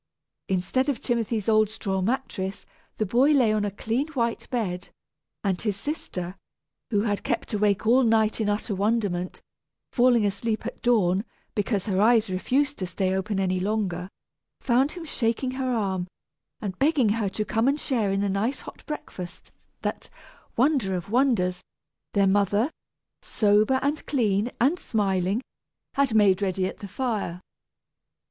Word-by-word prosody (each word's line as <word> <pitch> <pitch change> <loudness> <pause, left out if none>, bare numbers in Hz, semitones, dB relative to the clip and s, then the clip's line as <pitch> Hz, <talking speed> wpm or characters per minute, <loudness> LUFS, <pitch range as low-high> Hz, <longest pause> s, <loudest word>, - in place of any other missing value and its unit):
Instead 190 +9 +1
of 265 -5 -1
Timothy's 230 -3 -1
old 215 -1 +4
straw 195 -3 -2
mattress, 195 -3 -2 0.3
the 215 - +1
boy 250 +9 +4
lay 245 -6 +4
on 215 -1 +1
a 205 - 0
clean 225 +7 -2
white 235 -4 -1
bed; 200 -7 -2 0.5
and 190 -3 0
his 210 -3 -1
sister, 190 - -4 0.5
who 205 -4 +2
had 205 -2 -1
kept 235 -1 -2
awake 210 0 +1
all 245 +4 +5
night 225 -2 +3
in 210 - +1
utter 205 +1 -1
wonderment, 200 -3 -1 0.5
falling 245 -3 +4
asleep 215 +2 -1
at - - -6
dawn, 200 -6 +3 0.3
because 205 -2 0
her 195 -3 +1
eyes 225 -2 +4
refused 270 +10 0
to 185 - -2
stay 185 +2 -1
open 190 +1 -1
any 185 -1 +1
longer, 190 -3 -1 0.5
found 265 +3 +2
him 345 -2 -7
shaking 255 -2 -1
her 260 0 -2
arm, 190 -6 -1 0.5
and 195 -4 -4
begging 275 -5 +3
her 210 -1 0
to 215 +2 -3
come 225 +4 +1
and 280 +2 +2
share 230 -10 0
in 195 0 +1
the 205 - +1
nice 215 +7 -1
hot - - -11
breakfast 180 - -7 0.3
that - - -3 0.5
wonder 250 -8 +2
of 180 +3 -5
wonders! 225 -8 +2 0.5
their 200 -1 +4
mother, 205 - +2 0.5
sober, 215 +4 +3
and 290 +2 0
clean, 215 -5 +1
and 290 +9 +3
smiling, 195 0 0 0.5
had 275 -5 +2
made 200 -3 +5
ready 190 -1 0
at 185 - -4
the 200 - -8
fire. 205 -5 -2
215 Hz, 155 wpm, -26 LUFS, 195-245 Hz, 0.5 s, all